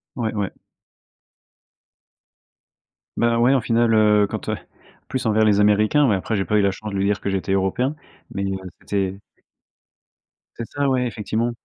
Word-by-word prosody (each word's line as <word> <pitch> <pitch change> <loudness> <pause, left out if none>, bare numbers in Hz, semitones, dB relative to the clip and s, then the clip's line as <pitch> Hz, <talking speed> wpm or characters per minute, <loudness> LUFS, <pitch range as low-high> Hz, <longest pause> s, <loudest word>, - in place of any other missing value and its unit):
Ouais, 115 -3 -2
ouais. 100 -2 -2 2.7
Bah, 115 0 +2
ouais, 125 +3 +4
au 135 - +3
final, 115 0 +2
heu, 105 -1 +4
quand, - - -5
heu, - - 0 0.5
plus 130 -2 -3
envers 110 0 +3
les 105 -1 +3
américains 105 +8 +4
ouais, 105 - +3
après 105 +3 -2
j'ai 95 - -1
pas 105 - 0
eu - - +4
la 100 -1 +2
chance 105 +2 -7
de - - -5
lui 95 - 0
dire 100 0 +1
que 100 - -3
j'étais 95 -1 -2
européen. 100 +9 0 0.4
Mais, 100 - -3
heu, 95 0 -2 0.2
c'était. 95 -1 -3 1.4
C'est 115 - -4
ça, 140 -1 -1
ouais, 125 -1 +1
effectivement 115 +1 -2
105 Hz, 170 wpm, -22 LUFS, 100-120 Hz, 2.7 s, ouais